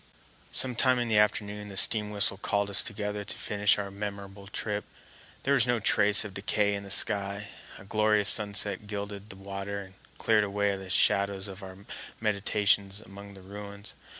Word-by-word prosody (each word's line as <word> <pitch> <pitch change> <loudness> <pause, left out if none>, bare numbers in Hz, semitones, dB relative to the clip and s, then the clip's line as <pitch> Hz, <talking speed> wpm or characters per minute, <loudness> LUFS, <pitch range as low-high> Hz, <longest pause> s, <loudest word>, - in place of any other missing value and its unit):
Some 130 -1 +3
time 130 +1 +3
in 120 -1 -2
the 110 -1 +4
afternoon 105 0 -1
the 95 - -8
steam 105 +1 +5
whistle 100 -1 +2
called 100 0 -1
us 100 - +3
together 105 -1 -4
to - - -4
finish 105 0 +1
our 100 -1 -5
memorable 100 -1 -7
trip. 105 +1 -4 0.6
There 140 - +1
was 125 -3 +3
no 120 -1 +1
trace 105 0 +4
of 105 - -8
decay 100 +1 0
in 100 - -4
the 100 - -11
sky; 100 0 +3 0.3
a - - -14
glorious 105 0 +2
sunset 105 -1 +1
gilded 100 0 -7
the 95 - -8
water 100 +1 -6
and 95 0 -16 0.2
cleared 110 -2 +2
away 100 0 -1
the 95 -1 -10
shadows 100 +1 +1
of 95 +1 -10
our 95 +1 -12 0.3
meditations 100 -1 0
among 100 -1 -13
the 95 - -14
ruins. 100 +1 -10
100 Hz, 180 wpm, -28 LUFS, 100-105 Hz, 0.6 s, steam